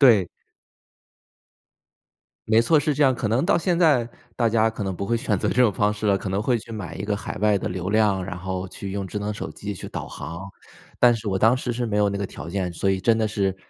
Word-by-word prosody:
对。 110 -10 +6 2.2
没 115 +1 +5
错， 155 +6 +4
是 150 +1 0
这 145 - +1
样， 135 -2 +5
可 120 -3 -3
能 115 +7 +1
到 185 - +3
现 175 0 0
在 145 -9 +3 0.3
大 115 -2 +2
家 110 0 +3
可 105 -2 -5
能 95 - -2
不 100 - -4
会 120 +3 +1
选 110 -2 0
择 - - -1
这 - - -1
种 120 -4 +5
方 105 +2 +1
式 105 0 -4
了， 100 - +4
可 95 - -5
能 95 +2 -1
会 120 +2 +1
去 115 +1 -9
买 95 -7 -6
一 95 - -5
个 100 0 -1
海 100 - -6
外 105 -1 +3
的 - - -3
流 90 +1 -3
量， 105 -3 +2
然 90 - -6
后 95 +1 -4
去 95 +1 -7
用 100 -1 -3
智 105 +2 -4
能 105 +1 -3
手 - - -5
机 105 0 -6
去 - - -8
导 - - -5
航， 85 +4 -7 0.5
但 120 -1 +7
是 115 -1 -5
我 95 - 0
当 110 +6 +4
时 125 -2 -3
是 120 +1 -2
没 110 -2 -1
有 105 -1 +3
那 100 - -2
个 100 - -2
条 90 - -8
件， 90 -1 -2
所 85 +4 -1
以 95 -1 +1
真 115 +3 +3
的 110 - +1
是， 100 -3 0
105 Hz, 280 characters per minute, -24 LUFS, 95-115 Hz, 2.2 s, 但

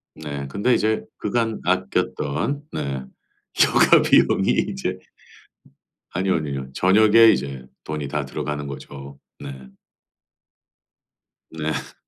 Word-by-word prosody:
네, 70 -3 -6
근데 100 - +1
이제 110 0 +1
그간 115 +1 -1
아꼈던 75 - -1
네. 65 -2 -4 0.5
휴가 - - +5
비용이 - - +3 0.2
이제 65 - -3 1.1
아니요, 95 +1 0
아니요. 70 -4 -4
저녁에 110 +6 +5
이제 65 -2 -4 0.2
돈이 75 -2 -4
다 75 +1 -2
들어가는 75 +2 -4
거죠. 70 0 -9 0.2
네. 65 -1 -9 1.8
네. 80 -1 -4
75 Hz, 200 characters per minute, -22 LUFS, 70-100 Hz, 1.8 s, 휴가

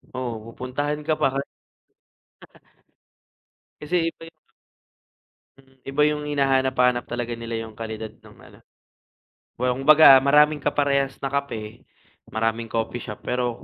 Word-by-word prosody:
oo, 125 -2 -3
pupuntahan 145 +5 -4
ka 155 +1 0
pa - - +3
hal 140 +1 -2 2.4
Kasi 165 +1 0
iba - - -37
yung - - -38 1.3
Mm, 135 0 -24
iba 140 +2 0
'yung 150 0 -2
hinahanap-hanap 130 -3 +2
talaga 120 0 -3
nila 115 0 -6
'yung 110 -1 -13
kalidad 110 -1 -6
ng - - -17
ano. - - -18 1.0
Kumbaga 135 +3 +6
maraming 150 +2 +4
kaparehas 140 -1 0
na 135 - -2
kape, 115 -7 -5 0.4
maraming 115 +1 -2
coffee 115 +2 -3
shop 105 - -9
pero, 125 -1 -2
130 Hz, 120 wpm, -23 LUFS, 115-145 Hz, 2.4 s, Kumbaga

